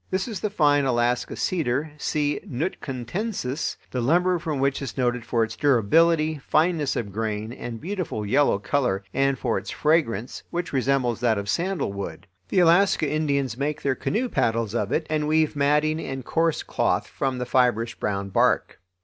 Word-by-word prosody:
This 190 +3 -1
is 215 -6 -4
the 215 - -1
fine 145 -7 +3
Alaska 120 -1 0
cedar 150 -3 -1
(C. 150 -1 0
Nootkatensis), 140 - -3
the 125 - -2
lumber 175 +7 +2
from 160 -3 -3
which 135 +1 0
is 140 - -6
noted 125 -2 0
for 115 -1 +1
its 110 0 -4
durability, 155 +5 +3
fineness 155 0 +1
of 100 -4 -3
grain, 110 +1 -3
and 120 -2 -6
beautiful 175 - -4
yellow 125 +2 +3
color, 105 -2 0
and 135 0 +2
for - - 0
its - - -9
fragrance, 135 - 0
which 175 -2 -4
resembles 130 -3 +1
that 115 -3 +2
of 100 0 -4
sandalwood. 165 - -2 0.2
The 185 - +3
Alaska 175 -1 +4
Indians 140 -5 0
make 150 +2 -2
their 140 - +2
canoe 225 - -1
paddles 115 - 0
of 105 -4 -1
it 160 - 0
and 155 -1 -1
weave 155 0 +2
matting 150 +2 +2
and 135 -4 -5
coarse 165 -1 +1
cloth - - 0
from 135 -2 -2
the 125 - -3
fibrous 120 -2 +2
brown 100 -3 -3
bark. - - +1
140 Hz, 165 wpm, -24 LUFS, 120-160 Hz, 0.2 s, Alaska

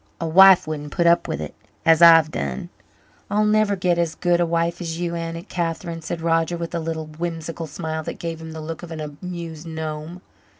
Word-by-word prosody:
A 165 - -2
wife 190 +3 +7
wouldn't 150 -1 -5
put 170 - +1
up 170 0 +4
with - - -3
it, 75 -1 -6 0.3
as 165 0 +5
I've 165 -2 +8
done." 70 -3 -4 0.6
"I'll 210 +1 +2
never 210 -1 +3
get 180 -2 +1
as 170 -2 0
good 175 -1 +1
a 175 - +2
wife 170 +1 -1
as 165 -1 -4
you, 175 -1 -2
Aunt 165 +2 -5
Catherine," 165 -1 -3
said 165 +1 -5
Roger 165 +1 +1
with 170 0 -5
a 170 - -1
little 160 -1 -4
whimsical 165 +1 -5
smile 160 +1 -4
that - - -5
gave 165 -1 -5
him 160 0 -8
the 160 0 -7
look 160 +1 -6
of 175 - -9
an 160 -1 -6
amused 165 +1 -7
gnome. 160 +2 -6
165 Hz, 210 wpm, -22 LUFS, 160-175 Hz, 0.6 s, I've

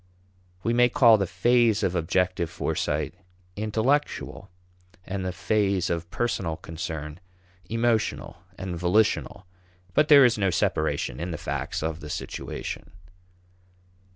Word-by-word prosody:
We 115 - +1
may 120 +1 +5
call 115 -3 +6
the 100 - 0
phase 115 +4 +3
of 90 - +1
objective 90 0 0
foresight 85 - -2 0.4
intellectual, 110 +7 -1 0.6
and 95 0 -4
the 90 - -2
phase 100 0 0
of 85 0 -3
personal 95 -7 -2
concern 80 -2 -6 0.5
emotional 115 -1 0 0.2
and 95 -2 -5
volitional, 95 +2 +1 0.5
but 150 +1 +3
there 140 -3 +8
is 120 -3 +2
no 95 -1 +2
separation 75 -6 -1
in 85 +2 -3
the 85 - -4
facts - - -3
of 80 0 -2
the 75 - -9
situation. - - -5
95 Hz, 125 wpm, -26 LUFS, 85-115 Hz, 0.6 s, there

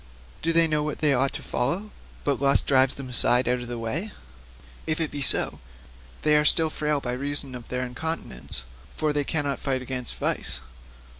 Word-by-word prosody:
Do 165 - +1
they 165 0 +5
know 155 -1 +1
what 150 0 -2
they 150 -2 +3
ought 135 +1 +3
to - - -5
follow, 175 +12 -1 0.3
but 140 -2 0
lust 140 0 +3
drives 130 -1 +4
them 135 -2 -7
aside 125 0 +3
out 125 +1 +2
of 120 - -7
the 120 0 -4
way? 150 - -2 0.8
If 155 +1 0
it 160 -2 0
be 145 - -4
so, 135 - +2 0.6
they 150 0 +4
are 150 - +4
still 160 +1 +4
frail 150 -1 0
by 125 -3 -3
reason 140 +1 -1
of 120 -2 -8
their 125 0 -2
incontinence, 125 - -4 0.3
for 155 -1 0
they 145 0 +1
cannot 145 -1 -1
fight 130 -2 -1
against 125 -1 -3
vice. 65 - -1
140 Hz, 195 wpm, -26 LUFS, 125-150 Hz, 0.8 s, they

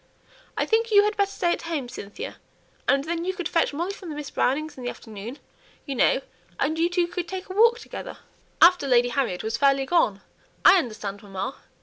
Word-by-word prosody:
I - - +1
think 455 +1 +1
you 410 -2 +6
had 420 +1 0
better 400 -1 +1
stay 345 -3 0
at - - -4
home, 315 -7 -3
Cynthia, 205 -4 -8 0.5
and 275 0 +3
then 335 +2 -2
you 375 +1 -2
could 355 -4 -3
fetch 330 - +1
Molly 340 +7 -3
from 365 -5 -9
Miss 295 -1 -6
Brownings' 305 +4 0
in 255 - -9
the 245 - -2
afternoon, 220 +2 -8 0.5
you 280 - -3
know, 265 - +3 0.4
and 315 +3 0
you 335 +1 +3
two 350 0 +2
could 345 0 -4
take 375 +1 -6
a - - -4
walk 460 +3 +5
together." - - -8 0.5
"After 350 -4 +6
Lady 245 -1 +4
Harriet 235 -8 -1
was 225 +1 -2
fairly 275 0 +3
gone! 230 - +2 0.4
I 385 - +9
understand, 215 - -5
mamma. 195 +5 -5
300 Hz, 205 wpm, -25 LUFS, 245-360 Hz, 0.5 s, I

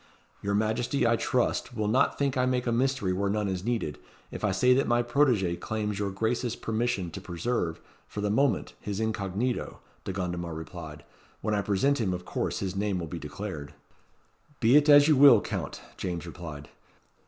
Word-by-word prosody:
"Your 100 0 -1
Majesty, 110 +5 +1
I 115 0 +4
trust, 125 +1 0
will 105 -1 0
not 120 +5 +2
think 140 -2 0
I 125 -1 +2
make 125 -1 0
a 120 - +1
mystery 125 -5 +1
where 100 +2 0
none 105 0 0
is 95 -2 -3
needed, 115 -10 -2 0.3
if - - -7
I 105 - +3
say 110 +7 +4
that 135 +2 +2
my 120 0 +3
protegé 120 -9 +2
claims 105 -2 -3
your 100 -1 -1
gracious 115 +4 -1
permission 110 -6 -1
to - - -7
preserve, 90 -1 -2 0.3
for - - -7
the 105 0 0
moment, 135 +4 +1
his 100 0 -4
incognito," 110 +2 -2 0.2
De - - -4
Gondomar 85 -3 -3
replied. 80 -2 -8 0.4
"When 110 - -1
I 105 - +2
present 105 +8 +1
him 95 -4 0
of 90 - -8
course - - -2
his 95 -1 -3
name 100 -1 0
will 85 - -3
be 85 +2 -6
declared." 75 0 -7 0.8
"Be 120 +3 +4
it 150 0 +5
as 145 0 +8
you 155 - +5
will, 135 -4 +8
Count," - - -5 0.2
James 85 -2 -4
replied. 80 -4 -8
105 Hz, 190 wpm, -28 LUFS, 90-120 Hz, 0.8 s, as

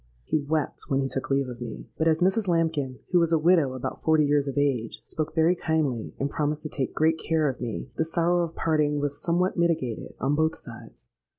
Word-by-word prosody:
He 155 - 0
wept 150 0 -2
when 135 - +1
he 135 - 0
took 135 0 -3
leave 135 -1 +1
of 125 -1 -8
me; 115 -2 -7
but 160 - +1
as 160 0 +2
Mrs. 195 +3 +2
Lambkin 160 -6 0
(who 180 - +5
was 170 -1 +2
a 165 - +5
widow, 155 -5 +3
about 130 - -5
forty 155 -1 +3
years 145 0 +2
of 140 - -4
age) 130 -6 0
spoke 155 0 -4
very 165 +2 +4
kindly, 150 -9 -1
and 140 - 0
promised 150 +1 -2
to 155 - -4
take 135 -3 -3
great 160 +1 +2
care 160 -1 +1
of 130 -2 -3
me, 120 +1 -4
the - - +2
sorrow 170 +2 +1
of 165 -1 -5
parting 150 -2 +1
was 145 0 -1
somewhat 180 +1 +1
mitigated 160 -9 -1
on 135 +3 +1
both 160 +2 +1
sides. - - -12
155 Hz, 220 wpm, -26 LUFS, 135-165 Hz, -, who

